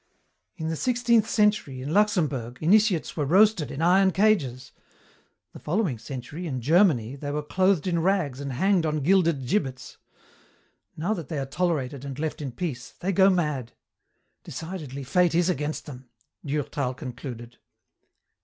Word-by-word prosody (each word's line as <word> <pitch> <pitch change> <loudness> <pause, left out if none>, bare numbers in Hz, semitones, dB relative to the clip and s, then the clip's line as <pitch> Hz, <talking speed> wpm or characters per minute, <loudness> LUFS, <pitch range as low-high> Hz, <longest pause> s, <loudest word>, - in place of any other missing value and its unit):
"In 160 0 -3
the 160 - -1
sixteenth 235 +1 +2
century, 210 - +1
in 145 +4 -4
Luxemburg, 150 - +1
initiates 195 +1 +2
were 150 - -1
roasted 180 - +4
in 150 - -4
iron 190 +3 +5
cages. 180 - +1 0.8
The - - -10
following 165 - -1
century, 135 +8 -7
in 130 -5 -3
Germany, 140 - +3
they 145 +1 -6
were 150 +1 -2
clothed 185 +2 +1
in 175 -2 0
rags 170 -8 0
and 140 -2 -4
hanged 190 +6 +2
on 155 -1 -1
gilded 170 -5 +2
gibbets. 135 -4 -2 1.0
Now 175 +8 0
that 170 -9 -6
they 155 - -4
are 135 - -2
tolerated 140 -4 -2
and 135 -2 -6
left 155 0 -3
in 140 -3 -4
peace 125 -2 -5
they 190 - -1
go 195 +1 +5
mad. 150 -10 -1 0.7
Decidedly, 150 -3 -7
fate 175 +5 +2
is 175 +1 +3
against 150 -2 -2
them," 130 -4 -11 0.3
Durtal 140 -3 -2
concluded. 125 -3 -8
155 Hz, 150 wpm, -26 LUFS, 135-185 Hz, 1.0 s, iron